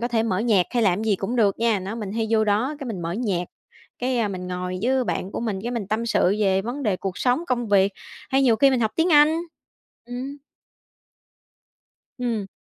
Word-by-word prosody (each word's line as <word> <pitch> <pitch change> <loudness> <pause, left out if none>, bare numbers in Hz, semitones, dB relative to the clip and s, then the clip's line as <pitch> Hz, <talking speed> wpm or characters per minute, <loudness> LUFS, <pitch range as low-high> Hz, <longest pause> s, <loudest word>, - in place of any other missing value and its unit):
có 240 - -1
thể 230 -2 +1
mở 195 -5 0
nhạc 210 -5 +3
hay 240 -2 +1
làm 190 -3 +3
cái 220 - -3
gì 200 - +3
cũng 225 +7 -3
được 205 -4 +2
nha. 230 -2 +2
Đó, 190 +3 -5
mình 210 -4 -5
hay 225 0 -1
vô 220 -1 +3
đó 215 +8 +1
cái 275 - -6
mình 195 -7 -5
mở 170 +1 -3
nhạc, 195 -5 -1 0.5
cái, 250 0 0
ơ, 225 -3 +1
mình 185 -2 -5
ngồi 180 0 -3
với 260 +2 +2
bạn 190 -4 -3
của - - -3
mình, 220 -4 -2
cái 240 - -3
mình 230 -5 -3
tâm 220 +2 -1
sự 205 -3 +2
về 195 -2 +2
vấn 245 +6 -4
đề 210 -7 +1
cuộc 190 -1 -5
sống, 255 +6 +1
công 240 -4 -1
việc, 200 0 +4 0.4
hay 270 0 +3
nhiều 240 -4 +4
khi 275 +4 +5
mình 260 -2 +1
học 220 -2 +1
tiếng 330 +1 +2
Anh, 300 +2 +6 0.7
ừm. 255 +4 -6 1.8
Ừm. 230 -5 -2
225 Hz, 230 wpm, -23 LUFS, 195-245 Hz, 1.8 s, Anh